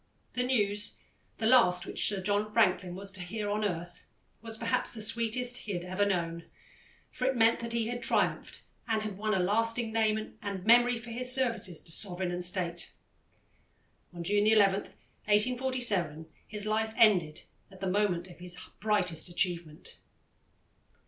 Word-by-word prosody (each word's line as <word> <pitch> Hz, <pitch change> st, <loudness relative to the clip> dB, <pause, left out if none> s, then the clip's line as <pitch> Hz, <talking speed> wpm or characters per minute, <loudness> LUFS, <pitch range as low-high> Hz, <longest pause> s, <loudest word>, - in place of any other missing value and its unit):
The 250 Hz, -, -1 dB
news, 210 Hz, -5 st, 0 dB, 0.4 s
the 220 Hz, -, -3 dB
last 220 Hz, -7 st, +5 dB
which -, -, +1 dB
Sir 195 Hz, -3 st, 0 dB
John 205 Hz, +2 st, 0 dB
Franklin 185 Hz, -5 st, +2 dB
was 195 Hz, +1 st, -5 dB
to 190 Hz, -2 st, -2 dB
hear 205 Hz, +4 st, -4 dB
on 210 Hz, +1 st, -1 dB
earth, 175 Hz, -3 st, -4 dB, 0.4 s
was 225 Hz, -1 st, -6 dB
perhaps 230 Hz, 0 st, 0 dB
the 230 Hz, -, -8 dB
sweetest 230 Hz, +3 st, +2 dB
he 205 Hz, -, -6 dB
had 175 Hz, -1 st, -4 dB
ever 185 Hz, +3 st, 0 dB
known, 170 Hz, -3 st, -2 dB, 0.7 s
for 255 Hz, -, -3 dB
it 265 Hz, -, +1 dB
meant 230 Hz, -1 st, +4 dB
that 235 Hz, 0 st, -4 dB
he 230 Hz, -1 st, 0 dB
had 240 Hz, +1 st, -4 dB
triumphed -, -, 0 dB, 0.2 s
and 220 Hz, -2 st, 0 dB
had 210 Hz, -2 st, -4 dB
won 215 Hz, +1 st, -1 dB
a -, -, +1 dB
lasting 225 Hz, +4 st, 0 dB
name 220 Hz, -1 st, 0 dB
and 200 Hz, -2 st, -5 dB
memory 240 Hz, +1 st, +5 dB
for 235 Hz, 0 st, -9 dB
his 250 Hz, +2 st, -1 dB
services 230 Hz, -10 st, 0 dB
to -, -, -8 dB
Sovereign 180 Hz, 0 st, -3 dB
and 175 Hz, 0 st, -3 dB
State. 175 Hz, -1 st, -2 dB, 1.2 s
On 175 Hz, -1 st, -7 dB
June 205 Hz, +4 st, +2 dB
11, 210 Hz, -3 st, +5 dB, 0.5 s
1847, 215 Hz, -, +1 dB, 0.2 s
his 210 Hz, -1 st, -4 dB
life 220 Hz, +1 st, -1 dB
ended 175 Hz, -8 st, +4 dB, 0.3 s
at 190 Hz, -1 st, -15 dB
the 195 Hz, -, -4 dB
moment 185 Hz, -2 st, +1 dB
of 175 Hz, -, -14 dB
his 180 Hz, 0 st, -7 dB, 0.2 s
brightest 190 Hz, -6 st, +1 dB
achievement. 170 Hz, -3 st, -2 dB
210 Hz, 160 wpm, -30 LUFS, 180-230 Hz, 1.2 s, last